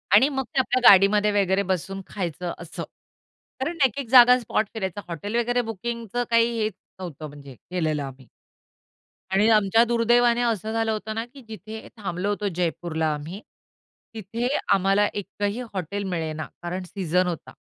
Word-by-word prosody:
आणि 265 +7 +6
मग 270 -2 -2
ते 270 - +4
आपल्या 255 0 +1
गाडीमध्ये 205 +2 +5
वगैरे 190 +1 +1
बसून 195 +2 -3
खायचं 175 -2 -4
असं, 170 -1 -7 0.8
कारण 330 +6 -2
एक-एक 255 0 -2
जागा 250 0 +8
स्पॉट 220 -2 -1
फिरायचा. 205 -3 -4
हॉटेल 180 +6 -5
वगैरे 245 +1 +1
बुकिंगचं 235 +2 -3
काही 230 0 +3
हेच 215 -1 0 0.3
नव्हतं 160 -4 -7
म्हणजे 140 -2 -12
केलेलं 155 0 -2
आम्ही. 135 -2 -10 1.0
आणि 195 +3 +3
आमच्या 215 +1 +5
दुर्दैवाने 240 +1 +3
असं 220 -3 -1
झालं 225 0 0
होतं 215 0 -4
ना, 225 +1 -2
की 265 +3 -15
जिथे 220 +1 -9
थांबलो 195 -2 -3
होतो 205 0 -1
जयपूरला 165 -2 -1
आम्ही. 160 +7 -7 0.7
तिथे 225 +3 -3 0.3
आम्हाला 195 +2 +3
एकही 205 +3 -3
हॉटेल 195 +2 -3
मिळेना 160 -4 -3 0.2
कारण 175 +2 -4
सीझन 180 -1 +1
होता. 170 -3 -5
205 Hz, 150 wpm, -24 LUFS, 180-230 Hz, 1.0 s, जागा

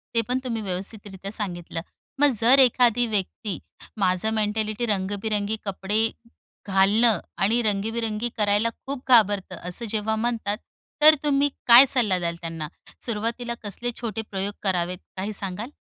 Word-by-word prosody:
ते 230 - +4
पण 250 +1 0
तुम्ही 230 -3 -3
व्यवस्थितरित्या 195 0 -5
सांगितलं. 175 -6 -4 0.4
मग 290 0 +6
जर 250 +4 +6
एखादी 245 -2 +4
व्यक्ती 205 -2 -3 0.4
माझं 190 +2 +1
मेंटॅलिटी 215 +1 -1
रंगीबिरंगी 205 +1 -1
कपडे 205 +3 0 0.6
घालणं 200 +2 +4 0.2
आणि 225 +5 +2
रंगीबिरंगी 220 +2 -1
करायला 210 +1 +2 0.2
खूप 275 -1 -5
घाबरते, 205 -6 +3
असं 180 +7 -4
जेव्हा 220 +1 -1
म्हणतात, 220 -2 -1 0.4
तर 310 +1 +9
तुम्ही 285 -1 +2 0.2
काय 240 +3 +10
सल्ला 230 -8 +2
द्याल 170 -1 -2
त्यांना? 165 -2 -5 0.4
सुरुवातीला 235 +2 -2
कसले 230 +4 -3
छोटे 225 -2 -3
प्रयोग 195 +1 -2
करावेत, 180 -2 0 0.2
काही 200 +3 -3
सांगाल? 200 +4 -2
215 Hz, 135 wpm, -24 LUFS, 195-235 Hz, 0.6 s, काय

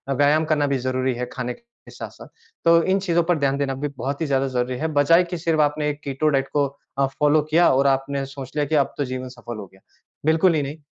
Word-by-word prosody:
व्यायाम 145 +3 +3
करना 150 -2 +1
भी 140 -1 0
ज़रूरी 130 0 -1
है 125 +1 -3
खाने 125 -1 -3
के 235 - -20
साथ-साथ। - - -9 0.4
तो 165 0 +6
इन 190 +2 +2
चीज़ों 170 -3 +1
पर 170 0 +1
ध्यान 140 -1 +1
देना 140 -1 -1
भी 145 +3 -3
बहुत 140 +5 -3
ही - - +1
ज़्यादा 135 -1 +1
ज़रूरी 125 -1 -2
है, 160 +5 -1
बजाए 155 +3 +4
कि 175 0 -5
सिर्फ़ 160 -2 +1
आपने 150 0 +1
एक 145 0 -4
कीटो 140 +2 -1
डाइट 135 -2 +1
को 145 -1 +3 0.3
अ, 140 - +4
फॉलो 150 +2 +2
किया 170 +2 +5
और 135 +1 +3
आपने 135 +1 0
सोच 135 -1 -9
लिया 150 -1 +1
कि 155 - -1
अब 140 -2 +2
तो 145 - -1
जीवन 130 0 -5
सफल 120 -2 -9
हो 105 - -7
गया। 95 - -21 0.4
बिल्कुल 160 +3 +4
ही 150 - +1
नहीं, 140 +3 -6
145 Hz, 245 wpm, -22 LUFS, 135-155 Hz, 0.4 s, तो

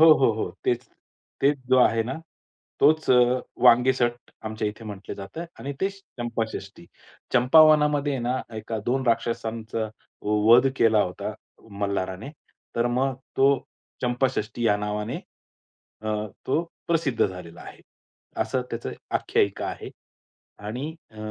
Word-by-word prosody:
हो, 160 0 +10
हो, 135 -6 +4
हो. 110 - -3
तेच - - +1 0.6
तेच 140 +1 +3
जो 130 0 +5
आहे 115 -2 +4
ना 125 +4 -4 0.7
तोच 155 +2 +4
अ, 130 - +7 0.5
वांगेसट 120 0 +4
आमच्या 110 -1 -2
इथे 105 +2 -9
म्हटलं 105 -2 -7
जातं 100 +12 -7 0.2
आणि 140 - -4
तेच 195 +1 0 0.2
चंपाषष्ठी. 110 -6 -4 0.5
चंपावनामध्ये 150 +1 +5
ना 125 +2 -1 0.2
एका 110 +1 -4
दोन 130 +2 0
राक्षसांचा 115 -1 -1 0.4
वध 110 +5 +5
केला 110 -2 +4
होता, 90 - -4 0.5
मल्हाराने, 100 +3 -2 0.5
तर 115 - +2
मग 135 +1 +1 0.2
तो 135 +1 +6 0.5
चंपाषष्ठी 120 -2 0
या 105 - +4
नावाने 105 +1 -3 0.9
अ, 110 - -3 0.4
तो 155 +5 +2 0.3
प्रसिद्ध 160 -7 +2
झालेला 90 -3 -9
आहे. - - -12 0.6
असं 130 - -1
त्याचं 115 0 -4 0.2
आख्यायिका 100 -1 0
आहे - - -6 0.8
आणि 130 +9 -4 0.2
अ, 110 - -19
120 Hz, 125 wpm, -25 LUFS, 110-135 Hz, 0.9 s, हो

